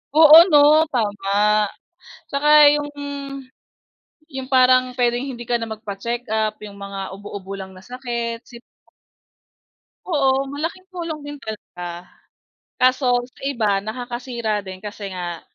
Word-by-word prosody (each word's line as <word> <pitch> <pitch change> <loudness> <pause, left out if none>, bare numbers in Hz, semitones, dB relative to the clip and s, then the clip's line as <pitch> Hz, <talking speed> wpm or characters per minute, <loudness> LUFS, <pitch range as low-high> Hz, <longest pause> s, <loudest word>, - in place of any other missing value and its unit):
Oo, 315 0 +10
'no 305 0 +6
tama 210 -1 +1 0.6
tsaka 280 +2 -1 0.3
yung 295 0 -2 1.4
yung 265 -4 -7
parang 255 -1 +4
pwedeng 240 0 +1
hindi 245 -3 -7
ka 240 - -1
na 225 - -5
magpacheck 220 +3 -5
up, 215 -1 -1
yung 210 -1 -10
mga 200 -1 -7
ubo-ubo 195 -1 -8
lang 190 -1 -7
na 185 - -14
sakit, 235 -1 -4
sipo 235 -1 -15 1.4
Oo 275 -5 +1
malaking 330 +6 -4
tulong 335 -3 -5
din 290 0 -7
talaga, 180 -5 -8 0.7
kaso 255 -1 +3
sa 250 - -22
iba 215 -7 +1
nakakasira 240 -1 -4
din 190 0 -8
kasi 205 -1 -6
nga, 175 -2 -5
235 Hz, 125 wpm, -21 LUFS, 205-265 Hz, 1.4 s, Oo